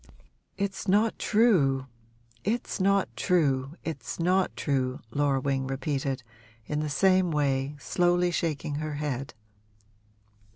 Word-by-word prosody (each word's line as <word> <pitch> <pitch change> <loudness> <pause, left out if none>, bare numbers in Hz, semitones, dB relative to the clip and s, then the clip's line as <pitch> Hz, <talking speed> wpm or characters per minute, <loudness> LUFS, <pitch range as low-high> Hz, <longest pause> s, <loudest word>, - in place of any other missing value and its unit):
'It's 195 -1 -3
not 210 +4 +2
true 165 - +3 0.6
it's 230 +2 -2
not 195 0 +3
true 145 -6 +1
it's 140 -6 -5
not 185 +2 +2
true,' 130 -2 -1
Laura 140 0 +1
Wing 135 -1 -1
repeated, 135 -1 -2 0.4
in 150 +4 -2
the 155 0 -2
same 185 +4 +3
way, 140 -2 0
slowly 175 +3 +2
shaking 150 -4 -2
her 155 -1 -3
head. 140 -3 -3
150 Hz, 115 wpm, -28 LUFS, 135-185 Hz, 0.6 s, true